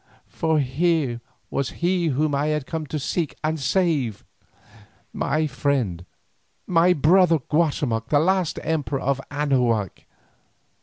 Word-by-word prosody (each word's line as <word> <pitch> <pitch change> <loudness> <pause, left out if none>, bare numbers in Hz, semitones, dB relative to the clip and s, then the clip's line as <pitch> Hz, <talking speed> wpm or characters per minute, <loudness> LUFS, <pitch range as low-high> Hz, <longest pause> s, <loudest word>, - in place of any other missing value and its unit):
For 160 -1 0
here 140 -2 0 0.3
was 140 -2 -1 0.2
he 175 -1 +2
whom 150 +1 0
I 140 +2 +1
had 150 -3 -1
come 160 -1 -4
to 155 - -3
seek 155 +2 -2
and 155 +1 -1
save, 140 - 0 0.9
my 155 +3 0
friend, 125 - -1 0.6
my 175 0 +4
brother, 170 +2 +4
Guatemoc 140 -6 -1
the 150 - +4
last 185 +2 +1
emperor 150 -4 -1
of 135 0 0
Anahuac. 125 - 0
150 Hz, 120 wpm, -23 LUFS, 130-160 Hz, 0.9 s, my